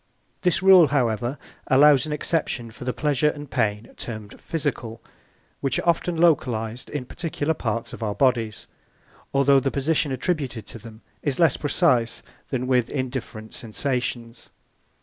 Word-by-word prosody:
This 180 0 +1
rule, 190 -4 +8
however, 120 -1 0 0.3
allows 140 0 +5
an - - -4
exception 150 -6 -2
for 125 - -10
the 125 - 0
pleasure 150 +1 +1
and 145 0 -6
the - - -23
pain 105 +1 -1
termed 110 -3 -8
physical, 140 -8 -3 0.6
which 135 -2 -1
are - - -3
often 170 0 +1
localised 125 -8 +1
in 145 -4 -4
particular 160 +1 -2
parts 115 -5 -3
of - - -9
our 105 -2 -2
bodies, 115 -6 +1 0.7
although 140 0 +4
the 135 - 0
position 145 +1 0
attributed 130 -4 -2
to 115 - -10
them 110 0 -13 0.2
is 145 -1 -1
less 165 -6 +5
precise 125 -7 +1 0.3
than 130 -2 -2
with 125 -2 +2
indifferent 125 -5 -5
sensations. 120 0 -3
130 Hz, 150 wpm, -24 LUFS, 115-150 Hz, 0.7 s, rule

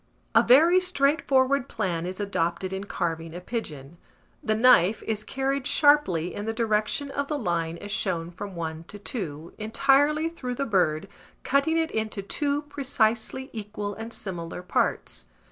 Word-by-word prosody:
A - - +7
very 325 +9 +6
straightforward 280 -5 +2
plan 180 -6 -2
is 185 +2 -6
adopted 185 -2 -1
in 190 +1 -4
carving 165 -3 -3
a - - -5
pigeon: 170 - -6 0.4
the 215 - 0
knife 220 -4 +5
is 215 -1 -2
carried 270 +2 -1
sharply 240 - +3
in 205 - -5
the 225 - -2
direction 225 +5 0
of 280 0 -2
the 300 - -2
line 170 - -1
as 205 +3 -8
shown 170 -4 -1
from 195 +2 -8
1 160 -1 -5
to 205 - -10
2, 170 - -6
entirely 275 +8 +3
through 255 -7 -5
the 275 - -1
bird, 180 - +1 0.4
cutting 280 +4 +2
it 325 0 0
into 220 -2 -2
two 285 +7 -1
precisely 265 -2 -1
equal 210 -2 -5
and 225 +2 -7
similar 175 -4 -6
parts. 180 - -1
215 Hz, 155 wpm, -26 LUFS, 180-275 Hz, 0.4 s, A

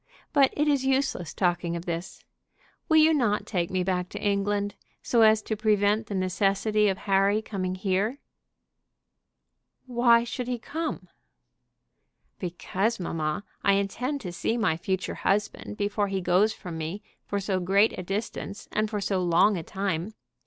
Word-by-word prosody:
But 275 -3 +5
it 300 +1 +2
is 285 -3 +2
useless 265 - 0
talking 175 -2 0
of 170 +1 -5
this. 170 0 -5 0.7
Will 315 - +5
you 315 +1 +6
not 235 -8 +1
take 175 -4 -1
me 185 -1 0
back 180 -1 -1
to - - -6
England, 205 0 0 0.3
so 235 - +2
as 220 -1 +5
to 220 - -2
prevent 210 0 +2
the 205 - -4
necessity 195 +3 +1
of 190 - -1
Harry 195 +2 +2
coming 185 -4 -3
here?" 195 +6 0 1.7
"Why 240 -2 +4
should 245 +1 -4
he 250 -1 -1
come?" 320 +7 -4 1.3
"Because, 190 +5 -2
mamma, 160 0 -2 0.2
I 200 - +4
intend 245 +8 -1
to 180 - -5
see 225 +6 -1
my 195 -9 +2
future 190 +3 -2
husband 210 +1 -1
before 205 0 0
he 195 -1 -1
goes 185 +4 +3
from 170 -6 -7
me 170 +7 -5 0.2
for 200 - -1
so 195 -1 -1
great 200 +4 +3
a - - -5
distance, 200 +1 -5
and 215 0 0
for 210 -2 -3
so 195 -1 0
long 180 +4 +4
a 175 - -3
time. 190 +2 -3
200 Hz, 160 wpm, -27 LUFS, 185-220 Hz, 1.7 s, you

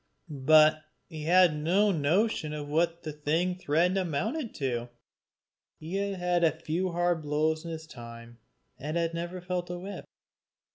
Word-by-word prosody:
But 155 0 +7 0.3
he 155 -3 -7
had 175 -1 +5
no 185 +7 +2
notion 160 +1 +1
of 150 -1 -5
what 170 +3 0
the 155 -2 -5
thing 160 +5 0
threatened 180 +2 +1
amounted 215 - -2
to. 120 -3 -2 0.9
He 165 +5 -4
had 180 -3 0
had 165 0 +1
few 175 +4 -1
hard 175 -1 +1
blows 155 +1 0
in 170 - -6
his 160 -1 -6
time, 115 -3 -11 0.4
and 155 +4 -3
had 165 -1 0
never 175 +2 -4
felt 180 0 -3
a 175 - -4
whip. 195 +3 -7
165 Hz, 150 wpm, -29 LUFS, 150-180 Hz, 0.9 s, But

